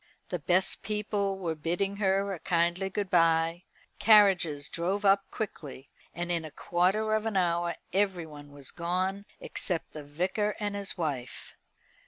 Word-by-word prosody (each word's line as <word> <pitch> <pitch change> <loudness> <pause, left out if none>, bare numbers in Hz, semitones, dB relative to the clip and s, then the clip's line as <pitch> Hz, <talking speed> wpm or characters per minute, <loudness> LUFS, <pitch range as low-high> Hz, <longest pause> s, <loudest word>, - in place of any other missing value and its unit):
The 180 - -2
best 180 +5 +1
people 205 -2 -1
were 175 -4 -2
bidding 175 +6 -1
her 195 0 +1
a 180 - -6
kindly 175 +3 +1
good 200 -1 -3
bye. 165 0 +3 0.3
Carriages 190 -9 +5
drove 190 +5 -2
up 195 0 +4
quickly, 145 -10 -6 0.2
and 175 0 -4
in 170 -2 0
a 155 - -7
quarter 190 +8 +1
of 215 +1 +1
an 215 -3 -1
hour 170 -1 +1 0.2
everyone 165 -7 -1
was 140 -2 -10
gone 185 +3 -2
except 175 -4 -3
the 150 - -8
Vicar 185 +8 -1
and 205 -1 -2
his 200 -1 -3
wife. 140 -7 -4
180 Hz, 150 wpm, -29 LUFS, 165-200 Hz, 0.3 s, Carriages